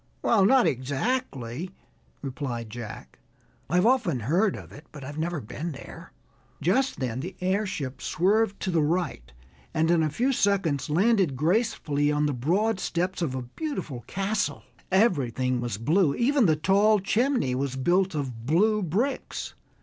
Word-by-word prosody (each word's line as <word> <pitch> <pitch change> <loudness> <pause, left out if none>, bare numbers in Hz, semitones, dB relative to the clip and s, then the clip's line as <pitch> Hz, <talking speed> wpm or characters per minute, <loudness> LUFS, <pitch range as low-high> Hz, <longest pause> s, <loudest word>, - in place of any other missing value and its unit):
"Well, 210 -5 +4
not 260 +4 +5
exactly," 135 - -2 0.5
replied 125 -5 -4
Jack. 115 -2 -9 0.5
"I've 180 +5 +3
often 225 - +2
heard 180 - +2
of - - -10
it, 145 - -13
but 150 -2 -10
I've 145 +3 -6
never 170 0 -1
been 150 +7 -5
there." 135 - -11 0.5
Just 255 - +1
then 125 -2 -2
the 180 +7 -6
airship 185 -8 -2
swerved 200 +4 +1
to 185 - -1
the 165 -2 +2
right 155 - -1 0.4
and 160 +1 +2
in 170 -1 +4
a 155 - +1
few 245 - 0
seconds 190 - +1
landed 190 - +3
gracefully 155 - +1
on 150 0 +1
the 145 - 0
broad 185 - +1
steps 180 +1 -2
of 140 -6 -1
a 130 - -3
beautiful 140 - -5
castle. 200 +2 -1 0.3
Everything 130 - +2
was 120 -4 -3
blue, 150 - +2
even 255 -2 +3
the 155 - +4
tall 200 +7 +3
chimney 230 - +1
was 135 +1 -2
built 175 +6 +1
of 125 -5 -4
blue 210 +8 +3
bricks. 205 - -2
170 Hz, 150 wpm, -26 LUFS, 135-205 Hz, 0.5 s, not